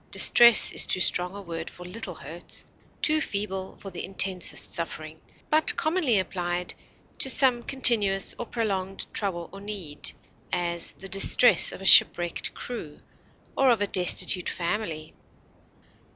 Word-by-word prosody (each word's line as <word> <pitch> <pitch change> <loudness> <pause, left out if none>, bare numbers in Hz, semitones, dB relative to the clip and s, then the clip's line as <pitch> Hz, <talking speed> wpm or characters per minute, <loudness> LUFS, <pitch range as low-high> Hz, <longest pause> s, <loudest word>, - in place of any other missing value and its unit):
Distress 235 -1 +5
is - - +2
too - - -2
strong 180 +1 -1
a 200 - -9
word 165 -2 -8
for 180 - -13
little 180 -1 -7
hurts, 160 +5 -8 0.4
too 310 0 +2
feeble 195 -4 -5
for 195 - -12
the 175 - -8
intensest 190 -1 0
suffering, 160 -1 -4 0.3
but 310 +1 +2
commonly 310 - -1
applied 180 -1 -4 0.5
to 265 - +4
some 255 -2 +4
continuous 220 -7 +5
or 240 - -7
prolonged 195 -5 -4
trouble 175 -5 -3
or 195 - -12
need; 195 -8 -5 0.4
as, 170 -1 -3
the 195 - -12
distress 195 +6 +3
of 195 - -11
a - - -9
shipwrecked 175 -2 +4
crew, 170 -12 -6 0.6
or 270 -1 +1
of 235 -3 +1
a 205 - -1
destitute 180 -1 +1
family. 170 -4 -5
195 Hz, 140 wpm, -24 LUFS, 175-225 Hz, 0.6 s, Distress